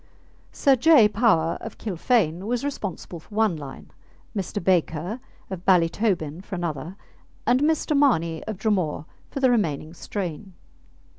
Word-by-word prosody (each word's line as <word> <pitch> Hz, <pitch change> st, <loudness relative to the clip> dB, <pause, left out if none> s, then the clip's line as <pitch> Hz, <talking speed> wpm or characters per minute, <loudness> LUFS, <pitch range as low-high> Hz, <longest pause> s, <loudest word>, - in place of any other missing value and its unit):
Sir 275 Hz, -2 st, +3 dB
J. 270 Hz, -3 st, +6 dB
Power, 205 Hz, -7 st, +2 dB
of 225 Hz, -, -8 dB
Kilfane, 190 Hz, -3 st, 0 dB
was 245 Hz, +2 st, -1 dB
responsible 200 Hz, -10 st, -5 dB
for 205 Hz, -, -15 dB
one 215 Hz, -5 st, +2 dB
line, 140 Hz, -3 st, -9 dB, 0.4 s
Mr. 195 Hz, 0 st, -3 dB
Baker, 175 Hz, +3 st, 0 dB, 0.3 s
of 180 Hz, -2 st, -5 dB
Ballytobin, 180 Hz, -2 st, +1 dB
for 200 Hz, -, -6 dB
another, 170 Hz, 0 st, -4 dB, 0.5 s
and 245 Hz, +1 st, +3 dB
Mr. 305 Hz, 0 st, +1 dB
Mahoney, 170 Hz, -, +2 dB
of 220 Hz, -3 st, -5 dB
Dromore, 185 Hz, -8 st, 0 dB, 0.2 s
for -, -, -5 dB
the 260 Hz, -2 st, +5 dB
remaining 160 Hz, -, 0 dB
strain. 185 Hz, +1 st, -5 dB
190 Hz, 135 wpm, -24 LUFS, 165-230 Hz, 0.5 s, J